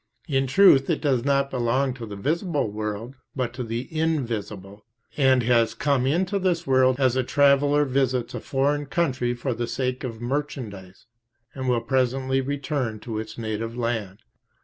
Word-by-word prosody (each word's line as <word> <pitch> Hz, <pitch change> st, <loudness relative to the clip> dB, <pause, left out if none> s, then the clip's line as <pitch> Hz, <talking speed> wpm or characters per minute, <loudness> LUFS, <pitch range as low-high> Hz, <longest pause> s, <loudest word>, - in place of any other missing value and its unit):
In 135 Hz, -2 st, +1 dB
truth 140 Hz, -3 st, +5 dB
it 165 Hz, -, +1 dB
does 130 Hz, -6 st, +1 dB
not 140 Hz, -1 st, +1 dB
belong 130 Hz, +2 st, 0 dB
to 120 Hz, -3 st, -8 dB
the 105 Hz, -, -7 dB
visible 150 Hz, -, -1 dB
world, 105 Hz, +3 st, -4 dB, 0.2 s
but 125 Hz, -3 st, -2 dB
to 125 Hz, +1 st, -4 dB
the 115 Hz, +2 st, -4 dB
invisible, 110 Hz, -, -2 dB, 0.3 s
and 130 Hz, -3 st, +3 dB
has 115 Hz, -1 st, +2 dB
come 140 Hz, -3 st, +1 dB
into 185 Hz, +7 st, +1 dB
this 175 Hz, -3 st, 0 dB
world 130 Hz, -1 st, +3 dB
as 130 Hz, -2 st, +3 dB
a 130 Hz, -, +2 dB
traveller 145 Hz, +2 st, +3 dB
visits 130 Hz, -2 st, 0 dB
a -, -, -4 dB
foreign 145 Hz, +2 st, 0 dB
country 130 Hz, -6 st, 0 dB
for 125 Hz, +1 st, -2 dB
the 120 Hz, +1 st, -3 dB
sake 130 Hz, 0 st, -2 dB
of 115 Hz, -4 st, -5 dB
merchandise, 120 Hz, -8 st, -5 dB, 0.5 s
and 130 Hz, -1 st, -3 dB
will 120 Hz, -2 st, +2 dB
presently 130 Hz, +1 st, 0 dB
return 135 Hz, -4 st, -3 dB
to 110 Hz, -2 st, -4 dB
its 110 Hz, 0 st, -7 dB
native 115 Hz, +1 st, -4 dB
land. 115 Hz, -5 st, -3 dB
130 Hz, 165 wpm, -24 LUFS, 115-140 Hz, 0.5 s, truth